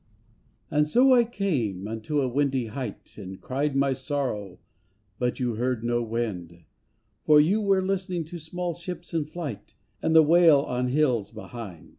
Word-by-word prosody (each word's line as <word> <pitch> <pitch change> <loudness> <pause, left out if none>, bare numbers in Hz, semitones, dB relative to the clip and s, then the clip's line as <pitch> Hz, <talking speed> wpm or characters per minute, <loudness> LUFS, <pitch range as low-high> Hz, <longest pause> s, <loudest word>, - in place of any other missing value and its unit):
And 150 0 +2
so, 255 - +5
I 245 -1 +6
came 140 - -2
unto 115 +7 -2
a 130 - +1
windy 135 -1 0
height 115 -3 -7
And 95 -1 -8
cried 140 +2 -2
my 135 0 +2
sorrow, 130 -9 -3 0.6
but 125 -1 -1
you 125 -2 0
heard 125 -1 -1
no 120 0 +1
wind. 100 -8 -4 0.6
For 150 -1 +6
you 190 +9 +3
were 195 -2 +2
listening 185 -3 -2
to 170 +2 -8
small 175 +2 -4
ships 175 +1 -8
in 160 -3 0
flight, 150 - -7 0.3
And 160 - +1
the 160 - +9
wail 160 -2 +6
on 125 -2 -2
hills 125 -6 +1
behind. 110 -6 -9
140 Hz, 160 wpm, -26 LUFS, 115-165 Hz, 0.6 s, the